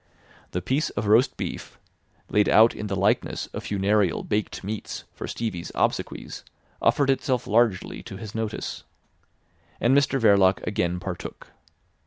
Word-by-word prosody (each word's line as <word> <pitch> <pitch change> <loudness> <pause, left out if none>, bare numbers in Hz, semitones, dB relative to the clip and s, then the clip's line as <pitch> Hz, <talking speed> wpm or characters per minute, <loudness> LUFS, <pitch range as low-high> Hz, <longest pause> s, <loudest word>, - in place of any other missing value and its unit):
The 90 - -3
piece 135 - 0
of 105 - -3
roast 110 +5 +4
beef, - - -6 0.5
laid 105 0 +2
out 115 +1 +6
in 105 - -5
the 100 - -2
likeness 95 +2 +1
of - - -5
funereal 100 -2 +1
baked 105 -1 -2
meats 105 +2 -5
for - - -6
Stevie's 105 -7 -4
obsequies, - - -2 0.4
offered 140 -2 +3
itself 130 -2 0
largely 110 -3 +1
to 95 - -9
his 110 0 -8
notice. 110 -1 -4 1.0
And 125 +3 +3
Mr 140 -1 +3
Verloc 100 -4 +4
again 90 -4 -1
partook. 90 -1 -7
105 Hz, 140 wpm, -25 LUFS, 95-115 Hz, 1.0 s, out